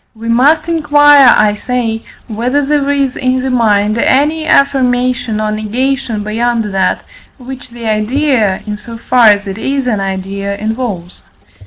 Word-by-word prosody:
We 230 +1 -7
must 280 +8 +2
inquire, 290 -4 +5
I 210 -1 +3
say, 225 0 -3 0.2
whether 250 +6 -1
there 285 -1 0
is 275 -2 0
in 255 0 -1
the 265 - -2
mind 215 -2 +1
any 305 +6 +1
affirmation 250 -5 +1
or 215 0 -1
negation 230 +1 -2
beyond 230 +2 -1
that, 190 -1 -1 0.3
which 260 0 -10
the 235 -1 -10
idea, 220 -1 0
in 210 -1 -5
so 230 +2 -10
far 235 0 +3
as 205 -1 +3
it 195 +1 -6
is 270 +2 -2
an 225 -5 -1
idea, 195 +1 -4
involves. 215 -5 -5
240 Hz, 150 wpm, -13 LUFS, 215-270 Hz, 0.3 s, inquire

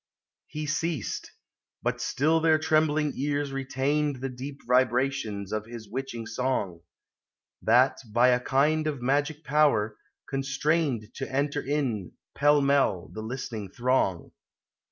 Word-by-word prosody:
He 155 0 -5
ceased. 155 -4 -2 0.5
But - - -1
still 155 +4 +2
their 160 -1 +4
trembling 155 -2 +2
ears 145 0 -1
retained 135 +2 0
The 135 +1 -4
deep 135 +3 -8
vibrations 125 -5 +1
of 110 0 -3
his 115 -2 -9
witching 120 0 -5
song; 110 -8 -2 0.8
That, 125 +4 +4
by 120 +3 +5
a 125 0 +4
kind 150 +5 +2
of 140 -5 -3
magic 145 +4 0
power, 140 -8 +2 0.3
constrained 135 -3 0
To 135 - -5
enter 140 +2 0
in, 130 - -2 0.2
pell 145 0 +4
mell, 140 -10 +2
the 110 - -5
listening 110 -3 -5
throng. 120 -6 0
135 Hz, 125 wpm, -27 LUFS, 120-145 Hz, 0.8 s, by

